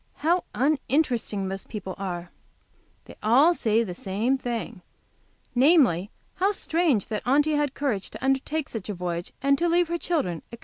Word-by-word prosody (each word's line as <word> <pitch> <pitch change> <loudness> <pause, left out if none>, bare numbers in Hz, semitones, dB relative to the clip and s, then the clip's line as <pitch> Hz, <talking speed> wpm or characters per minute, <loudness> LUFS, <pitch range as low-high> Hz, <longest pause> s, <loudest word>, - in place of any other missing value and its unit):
How 350 +2 +3
uninteresting 260 -6 0
most 195 0 -5
people 195 -4 -5
are! 175 -3 -5 0.7
They - - -12
all 265 +11 +5
say 225 -7 +1
the 185 -5 -5
same 205 +8 -1
thing, 235 -5 -4 0.7
namely, 250 - +4 0.3
how 390 +3 +2
strange 320 - +1
that 215 -2 -2
Aunty 290 +4 +3
had 295 -2 0
courage 240 -10 -2
to - - -7
undertake 275 +3 0
such 215 -3 -6
a 205 - -3
voyage, 175 -1 -4
and 275 0 +3
to 345 0 +2
leave 345 0 +2
her 340 0 -1
children, 185 - -1
etc. 235 - -9
245 Hz, 165 wpm, -26 LUFS, 195-300 Hz, 0.7 s, all